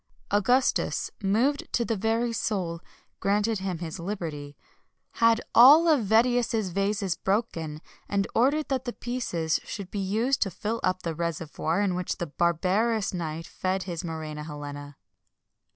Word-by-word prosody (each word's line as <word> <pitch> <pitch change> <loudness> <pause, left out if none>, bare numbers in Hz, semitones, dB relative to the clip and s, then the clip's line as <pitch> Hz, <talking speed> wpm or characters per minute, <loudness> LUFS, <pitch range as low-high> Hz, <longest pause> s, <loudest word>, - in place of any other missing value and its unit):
Augustus, 245 +6 +2
moved 230 +9 +1
to 235 - +1
the 225 - 0
very 225 +3 0
soul, 180 -7 -2 0.4
granted 210 +2 +1
him 190 -2 -3
his 165 +1 -6
liberty, 160 -6 -5 0.5
had 230 -1 +3
all 290 +8 +8
of 300 -7 +4
Vedius's 225 -1 +2
vases 195 -1 0
broken, 170 -7 -2 0.3
and 200 -1 +1
ordered 285 +6 +2
that 265 -1 -1
the 240 - -3
pieces 180 -10 -2
should 195 -3 -7
be 205 - -3
used 220 +8 0
to 195 - +2
fill 215 +5 -3
up 185 0 0
the 165 - -2
reservoir 165 +1 -2
in 200 -3 +1
which 180 0 -2
the 175 - -2
barbarous 185 +8 +1
knight 165 -2 -4
fed 185 0 -2
his 170 -3 -4
muræna 155 -2 -5
Helena. 145 -1 -8
195 Hz, 145 wpm, -27 LUFS, 170-230 Hz, 0.5 s, all